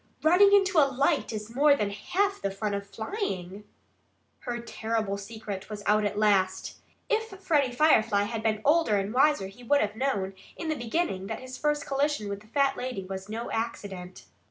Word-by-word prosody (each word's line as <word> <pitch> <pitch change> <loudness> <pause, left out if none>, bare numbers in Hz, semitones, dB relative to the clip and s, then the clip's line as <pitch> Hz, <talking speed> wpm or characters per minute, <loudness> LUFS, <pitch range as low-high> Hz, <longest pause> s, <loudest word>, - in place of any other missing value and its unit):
"Running 360 +6 +6
into 390 -3 +5
a 280 -2 +5
light 280 +3 +1
is 215 +1 -6
more 285 +3 +5
than 205 -6 -1
half 390 - -1
the 200 - 0
fun 205 +2 -3
of 200 0 -4
flying." 210 - -4 0.7
Her 240 -1 -4
terrible 220 -3 -2
secret 200 -1 -7
was 210 -1 -6
out 210 0 +3
at 205 0 -2
last. 190 -3 +1 0.3
If 445 -3 -1
Freddie 295 -9 +2
Firefly 225 -7 +4
had 220 +2 -3
been 215 -1 0
older 295 -8 +4
and 200 +2 -2
wiser 275 -4 +3
he 200 +6 -11
would 285 +4 +3
have 210 -3 -1
known, 205 -7 -1 0.2
in 330 - -5
the 310 - 0
beginning, 235 - -2
that 220 - -4
his 255 0 -8
first 295 0 0
collision 280 -6 0
with 200 0 -4
the 210 - -19
fat 275 +3 +1
lady 250 -7 -4
was 190 +1 -7
no 230 +2 -4
accident. 195 -5 -5
225 Hz, 185 wpm, -28 LUFS, 205-290 Hz, 0.7 s, Running